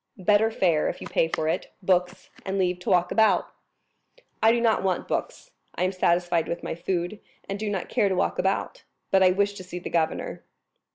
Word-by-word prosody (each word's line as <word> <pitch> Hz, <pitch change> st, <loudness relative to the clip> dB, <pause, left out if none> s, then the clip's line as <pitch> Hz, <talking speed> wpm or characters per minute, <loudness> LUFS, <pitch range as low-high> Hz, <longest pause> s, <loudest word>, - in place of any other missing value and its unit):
"Better 205 Hz, +3 st, +3 dB
fare, 175 Hz, -8 st, +1 dB
if -, -, -6 dB
you -, -, -8 dB
pay 165 Hz, -, +1 dB
for 160 Hz, -1 st, -2 dB
it, 160 Hz, -, -2 dB
books, 180 Hz, 0 st, 0 dB
and 195 Hz, 0 st, -3 dB
leave 180 Hz, -1 st, 0 dB
to 180 Hz, -, -5 dB
walk 180 Hz, -2 st, +3 dB
about." 220 Hz, -1 st, +3 dB, 0.9 s
"I 220 Hz, -, +6 dB
do 235 Hz, -, +2 dB
not 230 Hz, -2 st, +2 dB
want 190 Hz, -1 st, -1 dB
books, -, -, -4 dB, 0.2 s
I -, -, -1 dB
am 185 Hz, -, +1 dB
satisfied 175 Hz, -2 st, +1 dB
with 170 Hz, -, -4 dB
my -, -, -3 dB
food, 175 Hz, +3 st, -3 dB, 0.3 s
and 195 Hz, +1 st, -4 dB
do 215 Hz, 0 st, -2 dB
not 195 Hz, -3 st, -3 dB
care 200 Hz, -, +1 dB
to 190 Hz, -, 0 dB
walk -, -, 0 dB
about; 190 Hz, +1 st, -1 dB, 0.3 s
but 190 Hz, -, +4 dB
I 185 Hz, -, +7 dB
wish 200 Hz, +2 st, +1 dB
to 190 Hz, -, -9 dB
see 180 Hz, -1 st, -7 dB
the 180 Hz, -, -6 dB
governor." 165 Hz, -2 st, -1 dB
185 Hz, 210 wpm, -25 LUFS, 175-200 Hz, 0.9 s, I